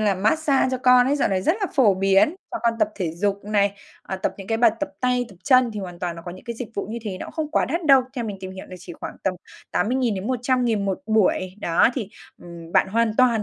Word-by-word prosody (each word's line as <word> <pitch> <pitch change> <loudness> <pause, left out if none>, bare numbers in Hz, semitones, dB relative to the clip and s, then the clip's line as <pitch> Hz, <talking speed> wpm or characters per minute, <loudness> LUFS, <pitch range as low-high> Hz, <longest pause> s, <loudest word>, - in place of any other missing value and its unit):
là 205 -2 +2
mát-xa 270 +8 +2
cho 255 - -1
con 250 0 +5
ấy, 285 +2 +2
dạo - - +1
này 190 -1 0
rất 325 - +2
là 395 - +1
phổ 235 -9 +5
biến, 195 - +3 0.2
cho 345 - -3
con 235 -1 +2
tập 215 -2 +2
thể 175 -5 -3
dục 200 +3 -1
này, 200 -1 +1 0.3
à, 190 - -5
tập 190 - -2
những 195 - -9
cái 225 +1 -1
bài 235 -1 +6
tập 295 - -1
tay, 250 -1 +1
tập 195 - -16
chân 255 -3 +5
thì 210 - -5
hoàn 180 -2 -8
toàn 175 -2 -3
nó 165 - -9
có 175 - -6
những 185 - -13
cái 235 -1 -5
dịch 240 -2 -6
vụ 200 - -3
như 235 - -4
thế, 200 -4 -5
nó - - -7
không 315 -2 -4
quá - - +2
đắt 335 +5 -3
đâu, 270 -2 +7
theo 240 - -2
mình 210 -3 -5
tìm 185 - -6
hiểu 190 0 -9
là 185 - -9
chỉ 180 0 -10
khoảng - - -8
tầm 190 - 0 0.4
80.000-100.000 245 0 0
1 190 -1 -1
buổi. 195 -4 +1
Đó, 170 +5 +3
thì, 225 -8 -3 0.3
ừm, 170 -1 -11
bạn - - +3
hoàn 225 +1 +1
toàn, 240 -4 +4
215 Hz, 265 wpm, -23 LUFS, 190-250 Hz, 0.4 s, đâu